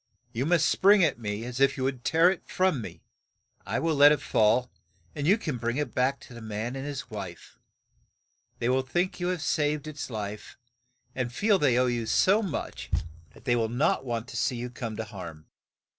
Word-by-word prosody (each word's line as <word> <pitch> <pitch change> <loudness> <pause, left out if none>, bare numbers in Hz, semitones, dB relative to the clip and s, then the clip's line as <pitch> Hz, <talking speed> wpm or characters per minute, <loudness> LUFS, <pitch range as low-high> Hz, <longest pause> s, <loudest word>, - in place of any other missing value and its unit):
You 125 +5 -1
must 165 -3 +3
spring 200 +3 +5
at 150 -7 +1
me 105 0 -4
as 125 +1 -5
if 135 0 +3
you 130 - -2
would 130 -2 -2
tear 165 +3 +4
it 190 - -5
from 185 -8 +1
me, - - -9 0.6
and - - -30
I - - +3
will 165 0 +1
let 145 0 +7
it 150 - +2
fall, 115 -1 +2 0.4
and 145 0 -3
you 200 +5 +5
can 155 - -3
bring 120 +2 -1
it 145 -5 -2
back 130 +2 +1
to - - -13
the 120 - -10
man 110 +3 -4
and 135 +1 -5
his 140 -3 -6
wife. 95 -5 -8 1.0
They 115 - -1
will 130 +1 +3
think 175 +9 -1
you 175 - -1
have 180 -3 -2
saved 150 -1 0
its 155 -3 -6
life, 105 -2 -6 0.6
and 125 -2 -2
feel 200 - +2
they 130 -6 +3
owe 125 - +4
you 120 -2 -1
so 200 - +4
much 190 -9 -5 0.5
that - - -17
they 120 -2 +3
will 115 -2 0
not 125 +2 +1
want 120 -2 -3
to - - -6
see 125 - 0
you 120 +1 -5
come 115 -3 -5
to 110 - -2
harm." 85 -8 -9
130 Hz, 215 wpm, -27 LUFS, 115-150 Hz, 1.0 s, let